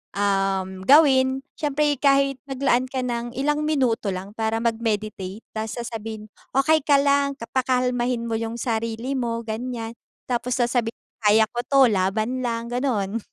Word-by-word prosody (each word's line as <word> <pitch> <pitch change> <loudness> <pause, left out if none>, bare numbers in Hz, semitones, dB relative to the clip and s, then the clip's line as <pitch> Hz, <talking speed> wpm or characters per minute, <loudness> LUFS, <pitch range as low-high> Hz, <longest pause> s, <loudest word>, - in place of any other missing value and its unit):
uhm, 195 -1 +1 0.2
gawin 270 -2 +5 0.2
siyempre 295 -1 +1
kahit 275 -1 +3
maglaan 260 -2 +1
ka 255 0 -3
ng 240 -1 -3
ilang 295 +3 0
minuto 240 -9 +1
lang 190 +2 -7
para 225 +1 -2
mag-meditate 215 -3 -2
ta's 220 0 -4
sasabihin, 225 -2 -6 0.2
"Okey 310 +4 +4
ka 290 - +6
lang," 280 0 +2
ka 270 - -10
pakalmahin 250 -2 0
mo 225 -1 -2
yung 230 0 -4
sarili 230 +1 -2
mo, 235 -3 -2
ganiyan. 225 +1 -4 0.4
Tapos 245 0 -1
sasabihin, 240 -1 0 0.3
"kaya 215 +2 +6
ko 240 - -4
'to, 275 +2 +3
laban 215 +6 0
lang," 230 0 -3
ganon. 230 -5 -1
240 Hz, 145 wpm, -23 LUFS, 220-265 Hz, 0.4 s, ka